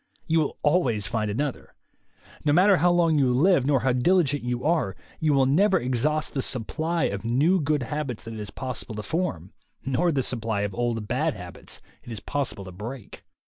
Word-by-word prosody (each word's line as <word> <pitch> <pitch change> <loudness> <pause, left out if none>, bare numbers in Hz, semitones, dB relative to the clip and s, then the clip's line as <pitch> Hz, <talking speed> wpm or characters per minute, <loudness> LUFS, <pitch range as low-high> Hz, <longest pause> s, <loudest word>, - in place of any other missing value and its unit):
You 165 0 +2
will 155 - -1
always 130 - +2
find 110 -2 -1
another. 135 +6 -3 0.7
No 150 - +2
matter 185 +5 +5
how 175 +4 +3
long 170 -3 +3
you 130 -3 +3
live 140 +1 +3
nor 140 -4 +3
how 130 +1 +2
diligent 145 +1 +2
you 125 0 -3
are, 155 - +1 0.2
you 155 -1 +2
will 135 -2 +4
never 185 +8 +3
ex 125 0 -1
haust 155 0 0
the 135 - -1
supply 155 +8 0
of 100 -5 -1
new 145 +11 +2
good 150 -1 0
habits 135 -2 -4
that 115 - -7
it 110 - -7
is 105 - -4
pos 130 -2 -4
sible 110 - -8
to 105 - -5
form, 140 - -3 0.3
nor 135 +6 +1
the 135 -4 0
supply 115 -4 -1
of 100 -1 -2
old 115 -2 -2
bad - - 0
habits - - -8 0.2
it 120 - -11
is 110 - -5
possible 135 -8 -3
to 95 - -8
break. 110 +6 -8
135 Hz, 205 wpm, -25 LUFS, 115-155 Hz, 0.7 s, matter